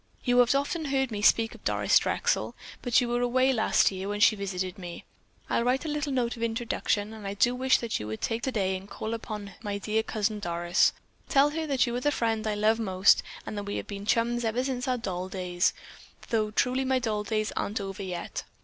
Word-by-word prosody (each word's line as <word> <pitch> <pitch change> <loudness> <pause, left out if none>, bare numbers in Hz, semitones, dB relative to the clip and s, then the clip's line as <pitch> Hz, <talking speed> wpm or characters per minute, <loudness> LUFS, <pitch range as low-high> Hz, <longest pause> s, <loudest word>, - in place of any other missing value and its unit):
You 245 -1 +3
have 245 +2 +5
often 295 +4 -1
heard 265 -3 0
me 205 -1 -3
speak 225 +1 +4
of - - -15
Doris - - +3
Drexel, - - 0 0.3
but 245 -2 +3
you 245 - 0
were 240 0 0
away 255 +2 +3
last 220 -3 +3
year 190 +1 -5
when 205 0 -2
she 220 +1 +6
visited 185 -2 -4
me. 175 -2 -8 0.4
I'll - - +1
write 255 +5 +1
a - - -2
little 295 -1 -2
note 245 -2 0
of 230 - -10
introduction, 225 -2 -1
and 215 -2 -8
I 200 - -4
do 240 +4 +3
wish 260 +1 +3
that 235 -2 -2
you 105 - -5
would 110 0 -5
take 225 +1 -2
it - - -3
today 200 -8 0
and 190 +2 -8
call 220 +2 -4
upon 210 -3 -6
my 205 -2 -3
dear 215 +2 0
Cousin 215 -1 -2
Doris. 175 -2 +2 0.4
Tell 285 +1 +4
her 320 +1 -3
that 275 -3 +2
you 240 -1 -3
are - - -3
the 290 - +2
friend 225 -4 0
I 210 - 0
love 215 +2 +2
most 190 -3 +4 0.2
and - - -5
that 205 0 -4
we 200 - -4
have - - -3
been 200 0 -7
chums 240 +1 +1
ever 230 +3 0
since 260 -1 -2
our 255 -1 +1
doll 185 -5 -4
days, 180 -2 0 0.6
though 220 -2 +1
truly 250 +5 +1
my 260 0 +2
doll 220 -4 -1
days 215 +1 -1
aren't 210 - -2
over 195 +1 -5
yet. 180 -2 -5
220 Hz, 230 wpm, -28 LUFS, 200-245 Hz, 0.6 s, she